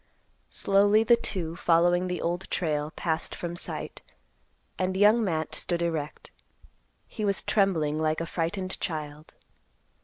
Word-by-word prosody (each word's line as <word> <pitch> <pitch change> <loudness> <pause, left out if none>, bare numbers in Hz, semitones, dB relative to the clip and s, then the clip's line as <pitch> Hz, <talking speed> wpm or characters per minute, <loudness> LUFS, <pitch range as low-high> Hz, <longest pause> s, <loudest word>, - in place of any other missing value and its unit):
Slowly 205 +2 +4
the 235 +1 +6
two, 175 -8 -3
following 175 +1 +3
the 180 -1 -3
Old 175 +2 -2
Trail, 150 -3 -1
passed 160 -1 -2
from 175 -1 -5
sight, 175 - -4 0.8
and 185 0 0
Young 210 +3 +5
Matt 160 -5 -1
stood 170 -1 -1
erect. 160 -3 -3 0.7
He 215 - -6
was 200 -2 +1
trembling 160 -7 +1
like 155 0 +1
a 165 - -2
frightened 185 +3 -3
child. 155 -2 -5
175 Hz, 130 wpm, -27 LUFS, 160-195 Hz, 0.8 s, the